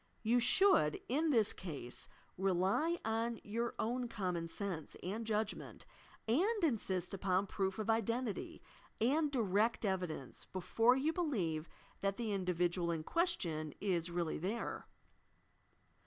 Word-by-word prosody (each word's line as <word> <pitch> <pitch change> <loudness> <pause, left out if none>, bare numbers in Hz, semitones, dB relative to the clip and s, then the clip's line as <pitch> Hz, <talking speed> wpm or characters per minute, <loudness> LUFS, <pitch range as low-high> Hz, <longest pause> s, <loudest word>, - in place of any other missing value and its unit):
You 235 +2 +4
should, 245 - +5
in 305 +6 +1
this 225 -7 +4
case, 145 -9 -4 0.3
rely 195 - +2
on 225 +1 0
your 230 +3 -2
own 245 +2 -1
common 180 -6 -2
sense 175 -3 -4
and 215 +5 -3
judgment, 215 -1 -2 0.4
and 380 - +2
insist 200 - 0
upon 190 0 +1
proof 190 0 -1
of 215 -1 -3
identity 230 0 -1 0.4
and 290 +7 +3
direct 220 -2 +2
evidence 180 -9 -3
before 225 +6 +3
you 295 +5 +1
believe 185 - -1 0.3
that 195 0 0
the 225 -3 -1
individual 180 -2 0
in 165 -2 -1
question 170 - 0
is 180 -4 0
really 170 -2 -1
there. 205 +8 -3
205 Hz, 125 wpm, -36 LUFS, 180-235 Hz, 0.4 s, should